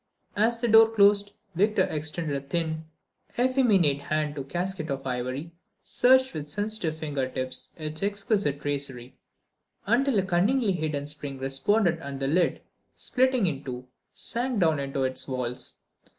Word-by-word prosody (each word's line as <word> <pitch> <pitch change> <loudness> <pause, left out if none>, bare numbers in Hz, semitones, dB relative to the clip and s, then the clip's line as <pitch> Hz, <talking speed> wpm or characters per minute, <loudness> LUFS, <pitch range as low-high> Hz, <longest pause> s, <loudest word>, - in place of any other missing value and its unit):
As 225 +3 +2
the 240 - 0
door 225 0 +7
closed 205 -2 +4 0.2
Victor 205 +5 +3
extended 155 0 -2
a 140 - -2
thin, 160 0 -2 0.5
effeminate 225 - +3
hand 150 +1 -1
to 145 - -5
a - - -5
casket 175 +3 -3
of 135 -1 -3
ivory, 130 +5 -3 0.3
searched 260 +1 +4
with 150 -2 -5
sensitive 205 -4 -2
finger 145 -4 -2
tips 130 0 -3
its 155 -1 -4
exquisite 200 -7 0
tracery 135 -3 -4 0.7
until 245 +3 +2
a 195 - +3
cunningly 200 +6 +2
hidden 155 -5 -2
spring 145 -2 -5
responded 165 +7 +1
and 140 -3 -6
the 135 - -1
lid, 170 +6 +1 0.3
splitting 255 -3 +1
in 145 -5 -2
two, 125 -1 -7 0.2
sank 240 -1 -2
down 160 -5 +3
into 135 -1 -2
its 130 0 -2
walls. 125 -2 -4
160 Hz, 150 wpm, -27 LUFS, 140-205 Hz, 0.7 s, door